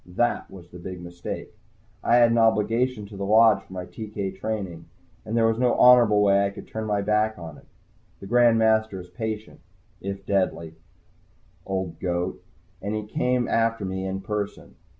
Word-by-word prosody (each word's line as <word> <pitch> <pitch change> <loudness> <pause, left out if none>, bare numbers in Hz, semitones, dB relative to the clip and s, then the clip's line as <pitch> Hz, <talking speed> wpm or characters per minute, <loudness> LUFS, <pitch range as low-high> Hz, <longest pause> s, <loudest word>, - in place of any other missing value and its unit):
That 120 +3 0
was 90 -3 -12
the 90 - -11
big 90 +1 -7
mistake. 85 0 -7 0.5
I 120 - +3
had 120 -1 +6
an 115 - +3
obligation 115 +1 +2
to 100 0 -11
the 100 - -5
Lodge 110 0 +5
for 95 - -21
my 90 -1 -5
TK 100 -2 -6
training, 95 -7 -4 0.4
and 110 +2 -3
there 115 - +4
was 115 0 +1
no 125 -1 +3
honorable 120 -4 +6
way 100 0 +4
I 100 - +1
could 100 - -11
turn 110 0 -5
my 105 -2 0
back 105 +1 +1
on 80 -3 -9
it. - - -22 0.5
The - - -10
Grand 120 +2 +4
Master 110 -3 +2
is 90 0 -11
a - - -28
patient, 110 -2 -5 0.4
if 100 0 -6
deadly, 95 -5 -1 0.9
old 95 -4 -3
goat, 90 0 -2 0.4
and 100 +2 -3
he 105 -1 -3
came 125 +3 0
after 115 -2 +1
me 95 0 -3
in 95 0 -4
person. 105 0 -5
105 Hz, 185 wpm, -25 LUFS, 95-115 Hz, 0.9 s, had